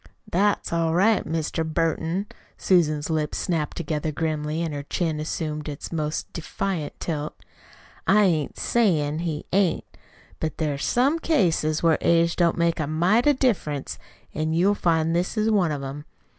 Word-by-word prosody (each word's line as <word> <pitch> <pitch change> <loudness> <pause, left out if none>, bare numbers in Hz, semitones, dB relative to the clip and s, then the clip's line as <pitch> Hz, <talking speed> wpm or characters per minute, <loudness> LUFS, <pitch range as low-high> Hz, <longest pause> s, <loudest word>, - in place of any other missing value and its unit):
"That's 200 0 +1
all 165 -1 +1
right, 210 +4 +3
Mr. 160 0 -1
Burton." 165 +3 -1 0.3
Susan's 155 -4 +2
lips 155 -2 -1
snapped 160 -4 -2
together 155 -2 -2
grimly 155 +1 -2
and 160 -2 -3
her 145 - -3
chin 155 +2 -2
assumed 155 -1 -3
its 145 - -7
most 155 -2 -3
defiant 170 -1 -4
tilt. 155 -2 -3 0.7
"I 210 +2 +5
ain't 160 -7 +1
sayin' 160 -10 +1
he 165 -3 -3
ain't. 190 -4 +2 0.5
But 160 -1 -3
there's 145 -3 -1
some 275 +7 +2
cases 170 - +1
where 165 -2 +4
age 170 0 +3
don't 170 -2 +2
make 170 -1 +1
a 155 - -1
mite 180 - +2
of 290 -2 +4
difference, 175 - -1 0.3
an' 155 +1 -1
you'll 185 +5 +3
find 165 -4 +1
this 180 +6 -1
is 215 +1 +2
one 185 -7 +2
of 145 -2 -3
'em. 140 +2 -6
165 Hz, 155 wpm, -24 LUFS, 155-180 Hz, 0.7 s, I